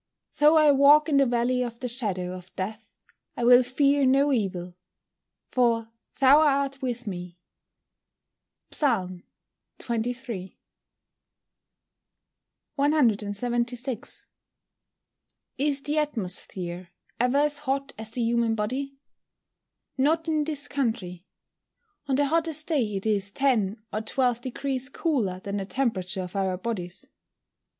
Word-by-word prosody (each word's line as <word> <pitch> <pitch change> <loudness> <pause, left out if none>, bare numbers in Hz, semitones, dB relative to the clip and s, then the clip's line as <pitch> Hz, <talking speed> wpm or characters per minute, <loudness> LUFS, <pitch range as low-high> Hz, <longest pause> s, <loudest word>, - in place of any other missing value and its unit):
[Verse: - - -25
"Though 300 +2 +6
I 305 -2 +6
walk 285 +3 +6
in 285 - +3
the 275 -1 +4
valley 245 +1 +1
of 235 -1 -4
the 255 - -3
shadow 195 -7 0
of 180 0 -12
death 215 +3 -6 0.4
I 240 - -2
will 245 +1 +7
fear 280 +3 +2
no 275 +2 +4
evil, 180 -6 -2 0.8
for 230 -2 +1 0.3
thou 270 +2 +7
art 275 -2 +1
with 245 -2 -3
me." 180 -3 -6 1.3
PSALM 185 - 0 0.5
XXIII.] 235 -4 -4 2.2
176. 240 -2 0 1.3
Is 285 0 +1
the 300 +1 +1
atmosphere 185 -9 -2 0.3
ever 250 +3 +2
as 295 0 +2
hot 275 -1 -2
as 220 0 -5
the 235 +1 -2
human 230 -1 +1
body? 265 +6 -3 1.0
Not 320 +4 +2
in 310 -2 +1
this 295 -2 -2
country. 220 -10 -3 0.8
On 270 - +1
the 290 +2 +2
hottest 315 0 -1
day 245 -11 0
it 195 - -4
is 200 -2 0
10 220 -4 +1 0.2
or 215 - -1
12 245 +1 0
deg. 265 +1 -3
cooler 230 - -1
than 200 +1 -4
the 195 - -3
temperature 195 -6 -2
of 180 +2 -9
our 190 -2 0
bodies. 190 -3 -5
245 Hz, 120 wpm, -26 LUFS, 205-275 Hz, 2.2 s, will